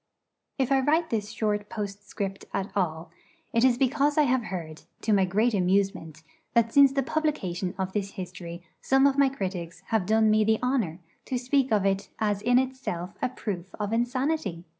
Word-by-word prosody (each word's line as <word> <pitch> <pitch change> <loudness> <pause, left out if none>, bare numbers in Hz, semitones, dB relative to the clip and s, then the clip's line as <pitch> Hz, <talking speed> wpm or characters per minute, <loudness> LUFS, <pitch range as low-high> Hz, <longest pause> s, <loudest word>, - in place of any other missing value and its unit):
If 265 -1 0
I 270 - +5
write 315 +5 +1
this 215 -2 -1
short 210 -2 -2
postscript 200 -1 -5
at 195 - -3
all, 165 -3 -1 0.4
it 230 0 +3
is 255 -2 +4
because 275 +3 +2
I 305 - +6
have 255 -4 +1
heard, 165 -5 -6 0.2
to 215 - +1
my 195 -2 +4
great 215 +6 +1
amusement, 185 -4 0 0.3
that 230 -1 +3
since 280 -1 +7
the 275 0 0
publication 200 - -2
of 190 -1 -3
this 200 -1 -2
history 180 -2 -7 0.2
some 270 +1 +3
of 280 0 +3
my 280 -1 +5
critics 185 -7 -5
have 215 -5 +1
done 220 0 +4
me 215 0 +4
the 220 +1 +3
honour 240 -11 0 0.3
to 260 - -2
speak 260 +1 +1
of 205 -3 +2
it 195 0 0
as 205 -2 0
in 245 +3 +3
itself 255 -9 -2
a - - +1
proof 195 -7 -6
of 210 +1 -2
insanity! 240 - -1
215 Hz, 185 wpm, -27 LUFS, 190-260 Hz, 0.4 s, since